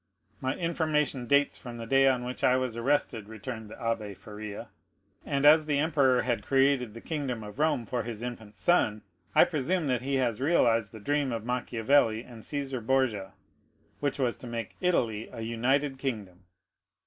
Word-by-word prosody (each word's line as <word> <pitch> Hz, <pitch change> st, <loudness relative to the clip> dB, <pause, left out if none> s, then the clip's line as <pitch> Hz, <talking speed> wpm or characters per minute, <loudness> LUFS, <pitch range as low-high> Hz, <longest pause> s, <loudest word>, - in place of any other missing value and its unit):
"My 130 Hz, 0 st, -1 dB
information 155 Hz, -6 st, 0 dB
dates 140 Hz, +2 st, +3 dB
from 120 Hz, -3 st, -8 dB
the 115 Hz, -, -6 dB
day 135 Hz, +3 st, +4 dB
on 125 Hz, -2 st, +2 dB
which 125 Hz, +1 st, -6 dB
I 125 Hz, -, +5 dB
was 130 Hz, -3 st, -2 dB
arrested," 115 Hz, -4 st, 0 dB
returned 110 Hz, 0 st, -7 dB
the 110 Hz, -, -9 dB
Abbé 110 Hz, -4 st, -3 dB
Faria; 105 Hz, -1 st, -8 dB, 0.5 s
"and 140 Hz, -1 st, 0 dB
as 155 Hz, +1 st, +7 dB
the 145 Hz, -2 st, +1 dB
emperor 140 Hz, -5 st, +3 dB
had 120 Hz, -2 st, -1 dB
created 135 Hz, -4 st, +2 dB
the 115 Hz, -, -8 dB
kingdom 135 Hz, -8 st, -3 dB
of 105 Hz, +6 st, -10 dB
Rome 150 Hz, -6 st, +1 dB
for 120 Hz, +3 st, -2 dB
his 115 Hz, 0 st, -6 dB
infant 110 Hz, -4 st, -7 dB
son, 110 Hz, -12 st, +2 dB, 0.3 s
I -, -, +8 dB
presume 175 Hz, +1 st, 0 dB
that 125 Hz, -2 st, +1 dB
he 135 Hz, +2 st, -1 dB
has 125 Hz, -3 st, 0 dB
realized 115 Hz, -, +3 dB
the 110 Hz, -, -10 dB
dream 145 Hz, +4 st, 0 dB
of 115 Hz, -2 st, -4 dB
Machiavelli 120 Hz, -1 st, +2 dB
and 120 Hz, -3 st, -12 dB
Cæsar 135 Hz, -2 st, -4 dB
Borgia, 115 Hz, -6 st, 0 dB, 0.7 s
which 145 Hz, -1 st, -1 dB
was 125 Hz, -4 st, 0 dB
to 125 Hz, -, -9 dB
make 115 Hz, -1 st, -5 dB
Italy 115 Hz, -, 0 dB
a 115 Hz, -, -7 dB
united 130 Hz, +5 st, 0 dB
kingdom." 100 Hz, -9 st, -5 dB
125 Hz, 175 wpm, -29 LUFS, 115-140 Hz, 0.7 s, I